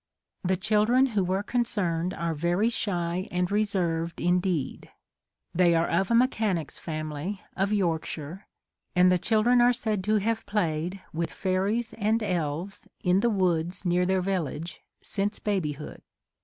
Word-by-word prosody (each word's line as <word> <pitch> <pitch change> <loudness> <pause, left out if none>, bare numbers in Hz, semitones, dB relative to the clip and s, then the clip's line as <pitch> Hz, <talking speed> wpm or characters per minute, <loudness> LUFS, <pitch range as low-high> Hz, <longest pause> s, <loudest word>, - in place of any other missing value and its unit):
The 185 0 +1
chil 210 +3 +2
dren 255 +4 +4
who 200 -2 +2
were 190 +2 0
concerned 200 -8 0
are 170 -1 -2
very 175 +8 +1
shy 180 -5 -1
and 180 +1 -1
reserved 175 -6 0
indeed.... 175 -4 0 0.6
They 175 -1 +4
are 165 +1 +2
of 190 +3 +1
a 235 - +3
me 245 +2 +6
chanic's 205 - -2
family 155 +5 -4
of 195 +2 0
Yorkshire, 170 -2 -2 0.5
and 180 0 +6
the 180 - +3
chil 215 +3 +2
dren 245 +1 +5
are 245 +1 +6
said 220 -5 -2
to 215 +1 +2
have 220 +2 0
played 180 -1 -1
with 165 +1 -2
fairies 200 +5 -1
and 220 +2 +1
elves 180 +2 -3
in 180 +1 +3
the 235 - +2
woods 180 -3 0
near 180 +1 +2
their 190 0 +2
village 170 -3 -3 0.2
since 205 +1 -1
babyhood. 155 -8 -3
185 Hz, 155 wpm, -27 LUFS, 170-210 Hz, 0.6 s, me